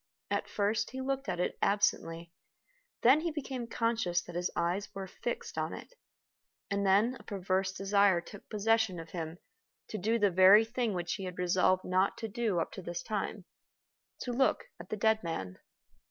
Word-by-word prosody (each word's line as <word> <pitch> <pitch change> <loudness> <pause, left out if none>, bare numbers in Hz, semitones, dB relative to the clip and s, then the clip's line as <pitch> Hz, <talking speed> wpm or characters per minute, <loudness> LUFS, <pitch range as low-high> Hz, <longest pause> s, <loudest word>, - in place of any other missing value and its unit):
At - - -1
first 210 +2 0
he 260 - -6
looked 270 +1 -2
at - - -2
it 180 - -1
absently; 170 -5 +1 0.7
then 260 +5 +7
he 340 - -1
became 270 -6 -4
conscious 230 -7 0
that 175 - -10
his 175 +1 0
eyes 175 +4 -1
were 195 -1 -4
fixed 235 +5 -5
on - - -2
it; - - -9 0.8
and 200 0 +1
then 205 +6 +4
a - - -14
perverse 190 -1 -1
desire 195 -1 +3
took 195 +3 -12
possession 220 -3 +1
of 165 0 -9
him 165 -1 -5 0.5
to 215 - -4
do 220 +5 +1
the 205 -3 +3
very 190 +5 +7
thing 235 -3 -1
which 175 -1 -2
he 195 - -4
had 180 -1 -6
resolved 185 +1 +2
not 185 +2 +1
to 225 - -4
do 220 -4 0
up 165 - -2
to 190 - -7
this 175 -1 -5
time 210 -2 -3 0.8
to 250 - -3
look 260 +2 +2 0.2
at - - -10
the 215 - -3
dead 220 +1 +3
man. 95 - -4
200 Hz, 185 wpm, -31 LUFS, 180-225 Hz, 0.8 s, then